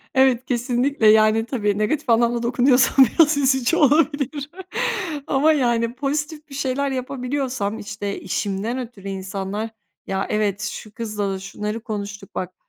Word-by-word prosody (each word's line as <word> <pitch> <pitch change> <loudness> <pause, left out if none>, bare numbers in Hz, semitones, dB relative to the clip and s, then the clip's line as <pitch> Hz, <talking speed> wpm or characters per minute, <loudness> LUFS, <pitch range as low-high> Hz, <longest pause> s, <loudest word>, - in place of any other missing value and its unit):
Evet, 260 -2 +4
kesinlikle, 245 0 +1
yani, 215 +1 +5
tabii 210 -6 -1
negatif 240 +6 -1
anlamda 235 +1 +3
dokunuyorsam 260 +2 +5
biraz 300 +4 +3
üzücü 265 +2 +2
olabilir 290 -1 +2 0.8
ama, 290 +3 +3
yani, 235 -3 +1
pozitif 295 +3 -3
bir 275 - -9
şeyler 275 0 -1
yapabiliyorsam, 255 -4 -3
işte, 205 -1 -5
işimden 210 +6 -2
ötürü 225 -5 -8
insanlar, 195 +3 -4 0.4
“Ya, 195 0 -1
evet, 210 -2 0
şu 210 0 -6
kızla 210 -3 -3
da 190 - -4
şunları 210 +3 -4
konuştuk, 205 -2 -6
bak, 185 0 -4
240 Hz, 130 wpm, -22 LUFS, 210-275 Hz, 0.8 s, yani